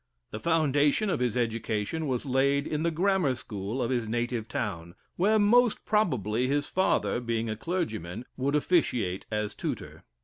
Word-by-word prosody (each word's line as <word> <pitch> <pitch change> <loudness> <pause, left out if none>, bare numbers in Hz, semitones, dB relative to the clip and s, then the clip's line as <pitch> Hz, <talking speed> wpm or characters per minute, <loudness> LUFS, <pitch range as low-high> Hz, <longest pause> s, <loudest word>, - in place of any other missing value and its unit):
The 110 - -5
foundation 155 - +2
of - - 0
his 125 -1 0
education 115 +5 -1
was 130 0 -1
laid 140 +2 +2
in 150 0 -2
the 170 - +2
grammar 175 -4 +1
school 110 +2 -4
of 120 - -1
his 120 -3 0
native 120 0 -2
town, 95 -11 -4 0.2
where 210 +5 +3
most 230 +3 +4
probably 125 - +1
his 145 +1 +1
father 190 -8 +1
(being 115 -1 -2
a - - -2
clergyman) 110 - -3
would 140 +3 0
officiate 125 - +1
as 105 -1 -2
tutor. - - -5
130 Hz, 160 wpm, -28 LUFS, 110-160 Hz, 0.2 s, most